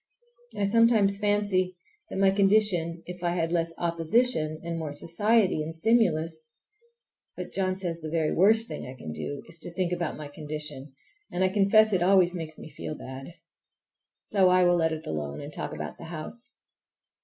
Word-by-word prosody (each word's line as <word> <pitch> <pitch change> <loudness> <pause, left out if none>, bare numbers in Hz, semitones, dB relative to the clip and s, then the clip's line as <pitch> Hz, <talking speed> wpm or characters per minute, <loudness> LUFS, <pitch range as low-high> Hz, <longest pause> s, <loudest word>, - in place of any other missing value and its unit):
I 205 - 0
sometimes 210 -2 +3
fancy 205 -3 +1 0.3
that - - -7
in 190 - -1
my 195 0 +5
condition 195 -4 +3
if 180 0 -9
I 175 0 0
had 165 -1 -1
less 165 -1 +1
opposition 165 -1 +1
and 170 0 -4
more 155 -2 -4
society 190 +5 +2
and 160 +1 -5
stimulus—but 220 - -3
John 185 -1 -1
says 175 -3 -3
the 155 - -5
very 160 -1 0
worst 220 +5 +4
thing - - -6
I 130 - -8
can 100 -11 -8
do 105 - -5
is 165 0 -5
to 175 - -7
think 180 0 -1
about 170 -2 -3
my 150 -1 -7
condition, 150 -2 -6 0.4
and 180 - 0
I 185 - +3
confess 210 +2 +4
it 185 - +2
always 180 -1 +4
makes 160 -3 -6
me 155 - -11
feel 155 +1 -6
bad. 130 0 -8 1.0
So 190 -3 +3
I 185 0 +5
will 175 0 +4
let 160 -1 +2
it 160 0 -5
alone 75 -2 -4
and - - -8
talk - - -5
about 75 0 -6
the - - -8
house. 175 +10 -5
175 Hz, 180 wpm, -27 LUFS, 155-200 Hz, 1.0 s, my